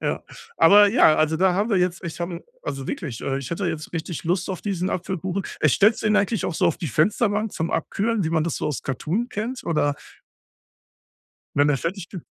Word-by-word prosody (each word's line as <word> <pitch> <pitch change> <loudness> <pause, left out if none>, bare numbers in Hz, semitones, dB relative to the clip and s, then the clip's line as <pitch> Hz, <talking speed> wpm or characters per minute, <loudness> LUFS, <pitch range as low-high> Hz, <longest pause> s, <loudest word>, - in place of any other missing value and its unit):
Ja. - - -2 0.3
Aber, 205 +1 +7
ja, 200 -7 +5
also, 155 +1 +2
da 185 +1 +3
haben 205 +4 0
wir 200 - +3
jetzt 180 +1 -1
ich 170 0 -6
habe 170 0 -4 0.2
also, 135 -1 -5
wirklich, 125 -8 -5
äh, 135 0 -1
ich 135 -2 -7
hätte 180 +3 -2
jetzt 160 -2 -4
richtig 165 -1 -4
Lust 175 +2 0
auf 185 - -4
diesen 190 -3 -2
Apfelkuchen. 185 +1 -3 0.2
Äh, 155 - +4
stellst 210 - +3
du - - 0
den 215 0 +3
eigentlich 205 0 +1
auch 175 - -2
so - - +2
auf - - +1
die 175 - -4
Fensterbank 210 - +1
zum 160 - -2
Abkühlen, 215 +6 0
wie 160 - -1
man 160 -2 +1
das 170 - -2
so - - -2
aus 150 - -3
Cartoon 175 - -2
kennt 245 +4 -4
oder? 145 -3 +1 1.6
Wenn 145 +1 +4
er 145 - +3
fertig 175 +6 -4
ge 180 -5 -8
175 Hz, 220 wpm, -23 LUFS, 155-205 Hz, 1.6 s, Aber